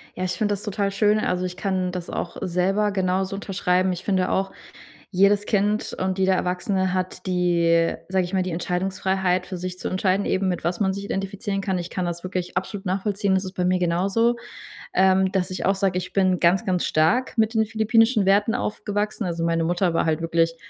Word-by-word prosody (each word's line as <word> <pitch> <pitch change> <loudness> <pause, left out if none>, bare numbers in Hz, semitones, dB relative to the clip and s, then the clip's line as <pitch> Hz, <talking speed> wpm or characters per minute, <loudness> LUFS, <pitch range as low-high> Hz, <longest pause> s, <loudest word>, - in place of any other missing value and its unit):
Ja, 185 - -4
ich 185 - -1
finde 210 0 0
das 200 - -5
total 200 -1 -1
schön 210 +1 +2
also, 180 -3 -1
ich 180 0 -5
kann 185 -2 -1
das 180 -1 -6
auch 175 - -4
selber 195 +4 +1
genauso 190 0 0
unterschreiben. 185 -2 0
Ich 180 +1 -7
finde 185 -2 +1
auch, 195 0 0 0.6
jedes 200 +2 +3
Kind 210 0 0
und 185 0 -1
jeder 190 0 +3
Erwachsene 185 +1 0
hat 185 0 -3
die- 170 -2 +2 0.2
sage 190 -1 +2
ich 180 - -7
mal- 190 - +2
die 185 - -3
Entscheidungsfreiheit 185 +1 -1
für 185 - -5
sich 180 0 -5
zu - - -3
entscheiden, 185 +1 0
eben 190 0 +1
mit 175 -3 -2
was 175 +3 -1
man 190 -2 +2
sich 200 +1 -5
identifizieren 195 +1 -3
kann. 190 -2 -1
Ich 175 0 -5
kann 185 - -2
das 175 0 -4
wirklich 180 -1 -4
absolut 195 +2 -6
nachvollziehen, 195 +1 0
das 190 +1 +1
ist 185 - -8
bei 180 - -1
mir 180 0 +2
genauso, 195 +7 +1 0.6
ähm, 190 0 +4
dass 185 -1 -1
ich 185 - -3
auch 195 - +3
sage, 190 -2 0
ich 180 0 -5
bin 185 -2 +2
ganz, 175 +2 +3
ganz 180 -2 0
stark 235 +11 +1
mit 220 +1 +2
den 220 -1 +2
philippinischen 220 0 +3
Werten 205 +3 +3
aufgewachsen. 210 0 -2
Also, 170 -2 -2
meine 165 0 +1
Mutter 175 +1 +1
war 165 - +1
halt 160 0 0
wirklich, 165 0 +1
190 Hz, 210 wpm, -23 LUFS, 180-200 Hz, 0.6 s, ähm